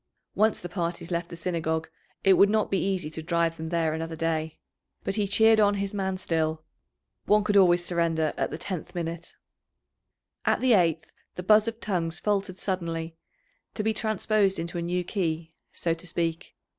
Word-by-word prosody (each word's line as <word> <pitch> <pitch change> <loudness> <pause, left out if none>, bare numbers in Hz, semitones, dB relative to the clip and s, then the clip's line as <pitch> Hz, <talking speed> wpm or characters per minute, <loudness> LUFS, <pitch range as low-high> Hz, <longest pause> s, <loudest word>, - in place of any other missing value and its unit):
Once 215 +1 +2
the 175 - -6
parties 170 -1 -4
left 170 0 -2
the 170 - -7
Synagogue 160 -2 -2 0.4
it 195 - +6
would 200 +2 +6
not 215 0 +1
be 195 - +1
easy 190 -5 -1
to 160 - -4
drive 170 0 0
them 160 0 -5
there 165 -2 +1
another 160 +1 -4
day. 160 -1 -2 0.5
But 195 - -2
he 210 -2 +1
cheered 220 +2 +5
on 205 -1 +4
his 200 0 -3
man 190 -2 -1
still 160 -3 -1 0.6
one 210 0 +4
could 205 0 0
always 175 -3 +5
surrender 165 -3 +1
at - - -1
the 155 - -5
tenth 180 -1 -6
minute. 170 -1 -5 1.1
At - - +2
the 255 -2 +4
eighth 165 -5 +2 0.2
the 180 - -5
buzz 215 +3 +5
of 230 0 -3
tongues 175 -6 -1
faltered 200 -3 -1
suddenly, 165 -4 -3 0.6
to 210 - -2
be 220 +1 +1
transposed 215 -2 +1
into 170 +1 -3
a - - -2
new 180 +1 -1
key, 165 -4 -2 0.2
so 165 - -1
to 165 +2 -8
speak. 165 -1 -2
175 Hz, 180 wpm, -27 LUFS, 165-200 Hz, 1.1 s, it